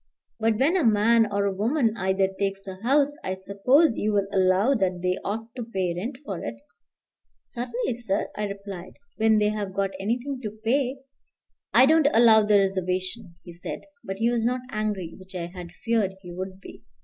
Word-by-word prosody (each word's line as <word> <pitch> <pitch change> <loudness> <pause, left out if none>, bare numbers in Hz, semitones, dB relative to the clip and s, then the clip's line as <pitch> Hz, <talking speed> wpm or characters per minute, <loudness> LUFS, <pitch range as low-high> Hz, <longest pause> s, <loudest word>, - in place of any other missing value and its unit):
"But 225 -1 +2
when 285 - +3
a 365 - +2
man, 225 0 +4
or 200 0 +1
a 200 - 0
woman 225 +3 +1
either, 190 -1 +1
takes 195 0 -3
a 190 -1 -7
house, 280 +4 +2
I 185 - -2
suppose 220 - +3
you 210 +1 0
will 200 -1 +2
allow 190 +6 +3
that 185 -7 0
they 180 +1 0
ought 225 +3 -4
to 245 - -4
pay 190 -6 -2
rent 235 +9 -4
for 195 -5 -5
it." 115 - -4 0.9
"Certainly, 245 0 -3
sir," 205 -5 -1
I 210 - -2
replied, 200 -3 -7 0.2
"when 220 0 +4
they 210 0 +3
have 205 -3 -4
got 195 0 0
anything 245 +6 -2
to 215 -2 -6
pay." 260 +3 +1 0.7
"I 255 - +7
don't 315 +1 +5
allow 225 -2 +7
the 210 0 +4
reservation," 185 0 -1
he 175 - -10
said. 170 - -6 0.2
But 195 0 -5
he 230 +3 +2
was 235 -2 0
not 250 +2 0
angry, 210 -6 -2
which 185 0 -13
I 175 -2 -3
had 175 -1 -9
feared 220 -5 +1
he 175 - -9
would 185 +1 -6
be. - - -12
210 Hz, 190 wpm, -25 LUFS, 190-235 Hz, 0.9 s, I